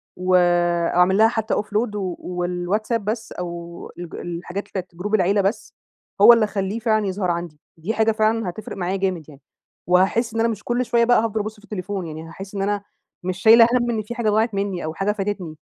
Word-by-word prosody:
وأعمل 175 Hz, 0 st, +3 dB
لها 220 Hz, -, +6 dB
حتى 220 Hz, -1 st, -2 dB
offload 210 Hz, +1 st, -1 dB
و 185 Hz, -4 st, -3 dB
والواتساب 180 Hz, +5 st, -2 dB
بس 220 Hz, +1 st, -3 dB
أو 170 Hz, -1 st, -7 dB
الج 175 Hz, -2 st, -7 dB
الحاجات 175 Hz, +3 st, -5 dB
بتاعة 185 Hz, -2 st, -4 dB
جروب 205 Hz, +5 st, -1 dB
العيلة 200 Hz, +1 st, +2 dB
بس، 195 Hz, +4 st, -2 dB, 0.5 s
هو 240 Hz, -, +10 dB
اللي 230 Hz, -2 st, +3 dB
أخليه 205 Hz, +1 st, -3 dB
فعلًا 215 Hz, -2 st, +1 dB
يظهر 185 Hz, -2 st, -1 dB
عندي. 170 Hz, -3 st, -5 dB, 0.2 s
دي 175 Hz, +8 st, -3 dB
حاجة 225 Hz, 0 st, +2 dB
فعلًا 220 Hz, -2 st, +1 dB
هتفرق 210 Hz, +4 st, -8 dB
معايا 185 Hz, +1 st, -1 dB
جامد 185 Hz, -5 st, -2 dB
يعني، 145 Hz, -1 st, -15 dB, 0.5 s
وهاحس 190 Hz, +6 st, +2 dB
إن 225 Hz, -, -2 dB
أنا 230 Hz, +1 st, +3 dB
مش 210 Hz, -2 st, -5 dB
كل 245 Hz, +1 st, 0 dB
شوية 235 Hz, +1 st, +2 dB
بقى 245 Hz, -2 st, +4 dB
هافضل 220 Hz, -1 st, -2 dB
أبص 215 Hz, +1 st, -6 dB
في 210 Hz, -, -20 dB
التليفون 195 Hz, -3 st, -5 dB
يعني، 155 Hz, 0 st, -7 dB
هاحس 195 Hz, +4 st, -10 dB
إن 195 Hz, -, -2 dB
أنا 205 Hz, 0 st, -1 dB, 0.4 s
مش 185 Hz, 0 st, -3 dB
شايلة 230 Hz, +1 st, +8 dB
هَم 240 Hz, -1 st, +2 dB
إن 220 Hz, -, -1 dB
في 215 Hz, +3 st, -7 dB
حاجة 235 Hz, -3 st, 0 dB
ضاعت 220 Hz, +2 st, +1 dB
مِنّي 195 Hz, -4 st, -2 dB
أو 160 Hz, -, -4 dB
حاجة 195 Hz, +5 st, 0 dB
فاتتني. 195 Hz, -6 st, -4 dB
200 Hz, 205 wpm, -22 LUFS, 180-220 Hz, 0.5 s, هو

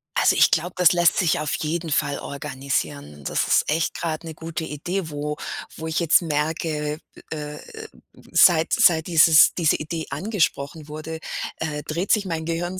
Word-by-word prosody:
Also, -, -, +3 dB
ich -, -, +5 dB
glaube, 175 Hz, +3 st, 0 dB
das 180 Hz, 0 st, +6 dB
lässt 175 Hz, -1 st, +3 dB
sich 170 Hz, -4 st, +2 dB
auf 150 Hz, 0 st, -1 dB
jeden 165 Hz, +2 st, -3 dB
Fall 145 Hz, -1 st, 0 dB
organisieren. 130 Hz, -, -4 dB
Das -, -, -1 dB
ist -, -, +4 dB
echt 160 Hz, +2 st, 0 dB
grade 165 Hz, -1 st, -4 dB
'ne 160 Hz, -, -7 dB
gute 165 Hz, 0 st, -5 dB
Idee, 160 Hz, +4 st, -4 dB
wo 150 Hz, 0 st, -4 dB, 0.4 s
wo 160 Hz, 0 st, -6 dB
ich 160 Hz, +2 st, -1 dB
jetzt 170 Hz, +1 st, +4 dB
merke, 150 Hz, -1 st, -2 dB, 0.3 s
äh, 150 Hz, -1 st, -5 dB, 0.7 s
seit 165 Hz, -3 st, +5 dB
seit 160 Hz, -2 st, +4 dB
dieses 160 Hz, -2 st, +6 dB
diese 165 Hz, -4 st, +2 dB
Idee 160 Hz, +1 st, -4 dB
angesprochen 165 Hz, -7 st, -2 dB
wurde, 155 Hz, +2 st, -7 dB, 0.4 s
äh, 150 Hz, -2 st, -4 dB
dreht 170 Hz, +5 st, -3 dB
sich 210 Hz, -2 st, +3 dB
mein 165 Hz, -3 st, -3 dB
Gehirn 175 Hz, +3 st, -3 dB
160 Hz, 165 wpm, -23 LUFS, 150-170 Hz, 0.7 s, das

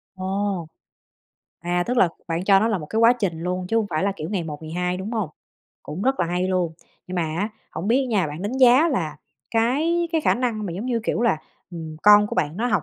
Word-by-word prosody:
Ồ! 190 Hz, -2 st, -2 dB, 0.9 s
À, 175 Hz, +1 st, 0 dB
tức 250 Hz, +1 st, -1 dB
là 185 Hz, -, +5 dB, 0.2 s
bạn 165 Hz, +2 st, -1 dB
cho 195 Hz, -1 st, +6 dB
nó 225 Hz, -, +2 dB
là 210 Hz, -4 st, 0 dB
một 150 Hz, -, -7 dB
cái 220 Hz, -, -2 dB
quá 230 Hz, +1 st, +7 dB
trình 190 Hz, -9 st, -2 dB
luôn 180 Hz, 0 st, -2 dB
chứ 225 Hz, -, 0 dB
hông 220 Hz, -, +2 dB
phải 155 Hz, +3 st, 0 dB
là, 200 Hz, 0 st, +1 dB
kiểu, 155 Hz, -, -5 dB
ngày 185 Hz, -5 st, -1 dB
một 150 Hz, 0 st, -7 dB
ngày 155 Hz, -, -7 dB
hai, 180 Hz, +1 st, -1 dB
đúng 200 Hz, +5 st, -5 dB
hông? 215 Hz, -8 st, -1 dB, 0.5 s
Cũng 155 Hz, +7 st, -6 dB
rất 265 Hz, -5 st, +1 dB
là 170 Hz, -, +2 dB
hay 180 Hz, +2 st, -1 dB
luôn. 180 Hz, -3 st, 0 dB, 0.3 s
Nhưng 185 Hz, -, -6 dB
mà 175 Hz, -, +1 dB
á 165 Hz, +7 st, -2 dB, 0.2 s
hổng 170 Hz, +7 st, -4 dB
biết 260 Hz, +4 st, +4 dB
á -, -, -3 dB
nha, 205 Hz, -8 st, +1 dB
bạn 150 Hz, +5 st, -6 dB
đánh 205 Hz, +4 st, -2 dB
giá 260 Hz, +5 st, +6 dB
là 160 Hz, -, -2 dB, 0.3 s
cái 305 Hz, +10 st, +1 dB
cái 320 Hz, -, +2 dB
khả -, -, +3 dB
năng 230 Hz, -4 st, -2 dB
mà 175 Hz, -, -4 dB
giống 195 Hz, +8 st, -5 dB
như, 240 Hz, -2 st, 0 dB
kiểu 230 Hz, -, 0 dB
là, 235 Hz, -8 st, +3 dB, 0.3 s
ừ, 170 Hz, -, -7 dB, 0.2 s
con 210 Hz, 0 st, +7 dB
của -, -, -5 dB
bạn 150 Hz, +3 st, -1 dB
nó 240 Hz, +3 st, 0 dB
học 210 Hz, -4 st, +1 dB
195 Hz, 255 wpm, -23 LUFS, 175-230 Hz, 0.9 s, quá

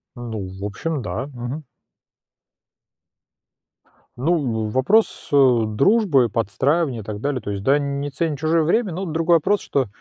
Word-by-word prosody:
Ну, 110 Hz, -5 st, -5 dB
в 95 Hz, +1 st, -9 dB
общем, 140 Hz, +9 st, -3 dB
да. 120 Hz, +4 st, -4 dB
Мгм. 135 Hz, +3 st, -6 dB, 2.5 s
Ну, 130 Hz, -7 st, 0 dB
вопрос, 135 Hz, -, +2 dB
э, 130 Hz, -4 st, +5 dB
дружбы, 140 Hz, -, +3 dB
подстраивания 130 Hz, -, 0 dB
и -, -, -11 dB
так 105 Hz, 0 st, -6 dB
далее, 135 Hz, +1 st, -2 dB
то 105 Hz, -, -5 dB
есть, 100 Hz, -1 st, -4 dB
да, 135 Hz, +5 st, +4 dB
не 140 Hz, 0 st, -3 dB
ценит 150 Hz, 0 st, -2 dB
чужое 160 Hz, +2 st, +2 dB
время, 195 Hz, +4 st, +1 dB
но 185 Hz, +4 st, -4 dB
другой 165 Hz, 0 st, +2 dB
вопрос, 195 Hz, +6 st, +1 dB
что, 135 Hz, -3 st, -1 dB
140 Hz, 145 wpm, -21 LUFS, 115-160 Hz, 2.5 s, э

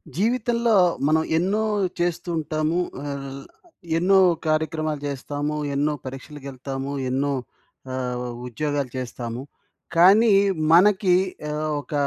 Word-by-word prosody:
జీవితంలో 235 Hz, +2 st, +1 dB, 0.3 s
మనం 160 Hz, +1 st, +3 dB, 0.2 s
ఎన్నో 195 Hz, +6 st, +1 dB, 0.4 s
చేస్తూ 175 Hz, 0 st, -1 dB
ఉంటాము. 155 Hz, +2 st, -1 dB, 0.2 s
ఆహ్, 140 Hz, -1 st, -6 dB, 0.5 s
ఎన్నో 190 Hz, +3 st, +4 dB, 0.3 s
కార్యక్రమాలు 155 Hz, -1 st, -1 dB
చేస్తాము 145 Hz, +2 st, -3 dB, 0.2 s
ఎన్నో 145 Hz, +2 st, +1 dB
పరీక్షలకెళ్తాము. 135 Hz, 0 st, -6 dB, 0.2 s
ఎన్నో 135 Hz, +2 st, 0 dB, 0.6 s
ఆహ్, 125 Hz, -1 st, -3 dB, 0.2 s
ఉద్యోగాలు 140 Hz, +1 st, -2 dB
చేస్తాము. 120 Hz, -1 st, -5 dB, 0.5 s
కానీ 200 Hz, +7 st, +6 dB, 0.4 s
మనకి 190 Hz, +1 st, +5 dB, 0.4 s
ఆహ్, 155 Hz, +1 st, -2 dB
ఒక 150 Hz, -, -11 dB
150 Hz, 95 wpm, -23 LUFS, 135-175 Hz, 0.6 s, కానీ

